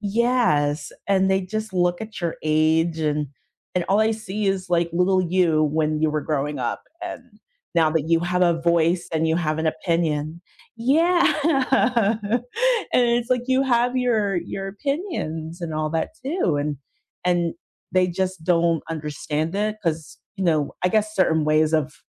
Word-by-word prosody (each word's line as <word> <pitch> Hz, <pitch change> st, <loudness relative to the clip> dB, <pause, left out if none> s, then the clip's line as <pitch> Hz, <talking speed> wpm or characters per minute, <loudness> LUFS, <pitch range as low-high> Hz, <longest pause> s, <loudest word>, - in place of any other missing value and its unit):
Yes, 205 Hz, -9 st, +1 dB, 0.2 s
and 190 Hz, -1 st, +2 dB
they 190 Hz, 0 st, +3 dB
just 215 Hz, +2 st, -4 dB
look 175 Hz, -1 st, +1 dB
at 220 Hz, -3 st, -7 dB
your 170 Hz, -1 st, -2 dB
age 160 Hz, +2 st, +2 dB
and 150 Hz, -1 st, 0 dB, 0.5 s
and 180 Hz, -1 st, 0 dB
all 195 Hz, +2 st, +3 dB
I 220 Hz, +1 st, +3 dB
see 215 Hz, -1 st, -4 dB
is, 190 Hz, -2 st, -1 dB
like, 170 Hz, -1 st, +2 dB
little 185 Hz, +2 st, +2 dB
you 170 Hz, -3 st, +2 dB
when 155 Hz, 0 st, 0 dB
you 155 Hz, -, +3 dB
were 150 Hz, 0 st, -1 dB
growing 150 Hz, -1 st, -2 dB
up, 120 Hz, -1 st, -3 dB, 0.2 s
and 355 Hz, -, -5 dB, 0.5 s
now 160 Hz, -2 st, +4 dB
that 160 Hz, -1 st, -1 dB
you 165 Hz, 0 st, +3 dB
have 180 Hz, +1 st, -1 dB
a 170 Hz, -2 st, +2 dB
voice, 170 Hz, +1 st, +2 dB
and 160 Hz, 0 st, +1 dB
you 160 Hz, -, +2 dB
have 155 Hz, -2 st, -1 dB
an 160 Hz, -, -1 dB
opinion 160 Hz, -1 st, -1 dB, 0.4 s
Yeah, 325 Hz, +9 st, +3 dB, 1.6 s
and 250 Hz, -, +4 dB
it's, 240 Hz, 0 st, +1 dB
like, 250 Hz, -1 st, +2 dB
you 260 Hz, 0 st, +2 dB
have 245 Hz, 0 st, +2 dB
your 220 Hz, -6 st, +1 dB
your 195 Hz, +3 st, -4 dB
opinions, 195 Hz, -, -4 dB
and 165 Hz, -2 st, -4 dB
all 155 Hz, 0 st, -1 dB
that 165 Hz, 0 st, -1 dB
too, 275 Hz, -, 0 dB
and 145 Hz, 0 st, -2 dB, 0.5 s
and 175 Hz, -2 st, +1 dB, 0.4 s
they 185 Hz, 0 st, +3 dB
just 185 Hz, -1 st, -3 dB
don't 170 Hz, -2 st, +2 dB
understand 155 Hz, +1 st, -3 dB
it, 215 Hz, +1 st, -1 dB
'cause, 160 Hz, -3 st, -3 dB, 0.2 s
you 195 Hz, -, -4 dB
know 155 Hz, -4 st, +1 dB
I -, -, +5 dB
guess 215 Hz, +2 st, 0 dB
certain 160 Hz, -5 st, +2 dB
ways 155 Hz, +1 st, +2 dB
of 155 Hz, -1 st, 0 dB
170 Hz, 170 wpm, -23 LUFS, 155-205 Hz, 1.6 s, I